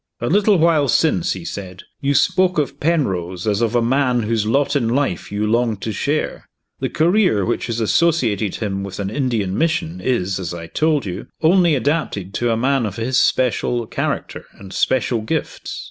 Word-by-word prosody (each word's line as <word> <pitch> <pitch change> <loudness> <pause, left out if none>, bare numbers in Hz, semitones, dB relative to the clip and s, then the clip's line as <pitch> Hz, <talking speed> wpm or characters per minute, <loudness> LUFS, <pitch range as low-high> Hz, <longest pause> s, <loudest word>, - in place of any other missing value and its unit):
"A 120 - -2
little 205 +2 +4
while 160 -3 +3
since," 130 - +2
he 90 -3 -8
said, 95 -1 -7 0.2
"you 140 +1 +1
spoke 185 +2 +3
of 150 -2 -1
Penrose 95 - -1
as 105 0 0
of 115 0 0
a 120 - +3
man 125 -1 +1
whose 110 -1 0
lot 140 +5 +1
in 125 -5 +1
life 125 -9 -1
you 105 +1 -1
longed 115 -1 +1
to 110 - -2
share. 145 +9 -2 0.3
The - - -2
career 170 - +2
which 120 - -1
has 115 -1 -2
associated 115 - +1
him 100 -3 -3
with 100 0 -7
an 100 0 -3
Indian 115 -7 -1
mission 165 - -1
is, 100 -7 0
as 90 -2 -4
I 85 -1 -7
told 150 - 0
you, 95 +2 -6 0.2
only 170 -1 +4
adapted 130 - -1
to 120 +1 0
a 115 - +1
man 130 -1 +1
of 100 - -6
his 125 +4 0
special 120 -1 +1
character - - -3
and 95 -1 -12
special 125 -3 +1
gifts. 110 - -4
120 Hz, 185 wpm, -20 LUFS, 100-150 Hz, 0.3 s, little